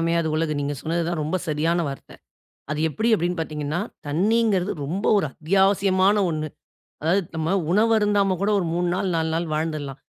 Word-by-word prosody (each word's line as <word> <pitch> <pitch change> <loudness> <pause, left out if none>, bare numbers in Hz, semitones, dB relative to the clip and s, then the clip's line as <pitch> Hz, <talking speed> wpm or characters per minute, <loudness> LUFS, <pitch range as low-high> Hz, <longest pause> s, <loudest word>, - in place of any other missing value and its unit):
அமையாது 165 0 +1
உலகு" 160 -1 0
நீங்க 145 +1 -2
சொன்னது 170 +2 -1
தா - - -1
ரொம்ப 155 +5 -1
சரியான 165 +3 +1
வார்த்த. 135 - -8 0.6
அது 150 - -2
எப்படி? 220 +9 -1
அப்டினு 175 -1 -1
பாத்தீங்கன்னா, 150 0 -3 0.3
தண்ணீங்கறது 200 +4 +2
ரொம்ப 185 +8 -3
ஒரு 195 - +1
அத்தியாவசியமான 195 +3 +3
ஒண்ணு. 155 -1 -2 0.6
அதாவது, 175 +6 +2
நம்ம 160 +3 0 0.2
உணவு 215 +5 +3
அருந்தாம 205 -2 +2
கூட, 205 - +2
ஒரு 175 - -2
3 175 0 0
நாள், 190 +1 -1
4 160 0 0
நாள் 170 +1 -1
வாழ்ந்துடலாம். 155 -3 -3
170 Hz, 165 wpm, -23 LUFS, 155-195 Hz, 0.6 s, அத்தியாவசியமான